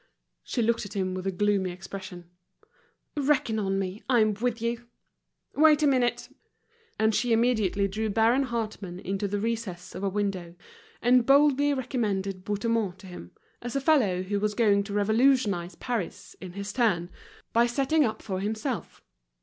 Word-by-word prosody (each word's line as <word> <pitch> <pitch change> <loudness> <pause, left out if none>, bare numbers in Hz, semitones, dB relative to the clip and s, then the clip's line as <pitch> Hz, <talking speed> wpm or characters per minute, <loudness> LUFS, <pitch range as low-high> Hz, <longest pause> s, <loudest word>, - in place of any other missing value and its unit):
She 240 - -2
looked 230 +1 +1
at 205 0 -9
him 185 -2 -1
with 185 +1 -4
a - - +1
gloomy 195 0 +1
expression. 185 -1 -8 0.9
"Reckon 280 -6 +1
on 195 -2 0
me, 195 +2 -3
I'm 220 -4 +4
with 235 +2 -2
you. 235 +1 -3 0.7
Wait 305 0 +5
a - - +5
minute." 255 -4 +1 0.7
And 220 0 +2
she 245 +3 0
immediately 220 -4 +2
drew 215 +3 -2
Baron 230 +6 +3
Hartmann 215 -6 -4
into 195 +2 -2
the 205 +1 -2
recess 220 -5 -4
of 195 - -6
a 200 - +1
window, 190 -4 -3 0.5
and 245 +1 +5
boldly 285 +1 +5
recommended 205 -7 -2
Bouthemont 205 -1 -1
to 195 - -15
him, 175 - -10 0.3
as 245 +2 -6
a - - +2
fellow 250 - +2
who 200 +2 -2
was 210 0 -1
going 205 -4 +3
to 200 - -6
revolutionize 210 -3 +2
Paris, 235 -8 -4
in 185 -2 -8
his 200 +1 -5
turn, 190 -8 +1 0.4
by 235 +1 +4
setting 275 +5 +2
up 220 -4 -2
for 190 -2 -3
himself. 220 +5 -4
215 Hz, 160 wpm, -27 LUFS, 195-240 Hz, 0.9 s, Wait